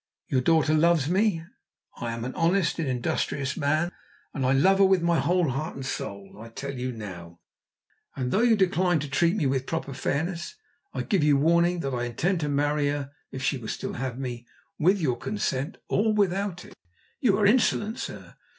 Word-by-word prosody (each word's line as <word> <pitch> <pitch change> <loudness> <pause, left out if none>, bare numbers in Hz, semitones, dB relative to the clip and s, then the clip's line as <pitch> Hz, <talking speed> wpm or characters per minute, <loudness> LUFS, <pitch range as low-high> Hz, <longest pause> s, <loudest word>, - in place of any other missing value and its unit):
Your 130 - +2
daughter 155 +2 +3
loves 160 -2 +3
me. 185 -1 +1 0.5
I 120 - -3
am 115 0 -4
an 130 - -4
honest 170 0 +1
and 160 - -1
an 130 - 0
industrious 135 +3 -2
man, 155 +5 +1 0.4
and 135 - -2
I - - +3
love 190 +9 +4
her - - +7
with 190 -2 +3
my 170 -1 +3
whole 175 -3 +2
heart 150 +6 -3
and 135 - -6
soul. 100 -6 -6
I 115 - -10
tell 140 +4 -6
you 130 0 -3
now, 90 -7 -9 0.8
and 125 -2 -2
though 210 - +2
you 235 -2 +5
decline 185 -3 +2
to 150 - -4
treat 165 +6 +2
me 190 - 0
with 130 -1 0
proper 160 -4 -3
fairness, 165 - -2 0.4
I - - -3
give 195 -8 +1
you 145 -2 +4
warning 170 +3 +3
that 135 -3 -3
I 120 -1 -1
intend 165 - 0
to 150 -2 -2
marry 145 +1 +1
her 145 -1 -3 0.2
if 130 - -6
she 135 -1 0
will 110 - -8
still - - -4
have 130 -1 -4
me 120 -3 -5 0.3
with 185 +5 +3
your 130 -8 0
consent 145 - -2
or 215 +2 +2
without 195 -3 0
it!" - - -14 0.5
"You 205 -7 +3
are 210 - +2
insolent, 220 0 +2
sir." - - -7
155 Hz, 200 wpm, -26 LUFS, 130-180 Hz, 0.8 s, her